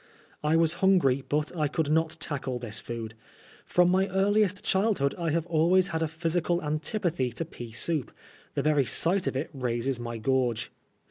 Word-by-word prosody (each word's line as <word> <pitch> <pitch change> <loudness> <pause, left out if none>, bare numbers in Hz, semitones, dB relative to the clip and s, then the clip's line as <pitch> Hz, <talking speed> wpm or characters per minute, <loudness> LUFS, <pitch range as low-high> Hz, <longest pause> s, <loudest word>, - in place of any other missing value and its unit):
I 150 +2 +2
was 165 -1 +4
hungry, 165 -9 +3
but 150 +3 -1
I 155 -3 +1
conld 150 +1 -1
not 160 0 +1
tackle 140 -5 -4
this 110 -3 -2
food. 115 -2 -6 0.5
From 180 0 +4
my 190 +1 +2
earliest 200 +1 +1
childhood 190 -8 +1
I 170 -2 -2
have 165 +1 0
always 175 +3 +3
had 160 0 -2
a 160 - +1
physical 165 +2 -1
antipathy 155 - -1
to 165 - -3
pea 120 -7 -9
sonp. 140 +4 0 0.5
The - - 0
very 150 -3 +3
sight 180 - +2
of - - -1
it 135 +5 -3
raises 125 -1 -2
my 120 -1 -5
gorge. 120 -1 0
155 Hz, 175 wpm, -28 LUFS, 130-175 Hz, 0.5 s, was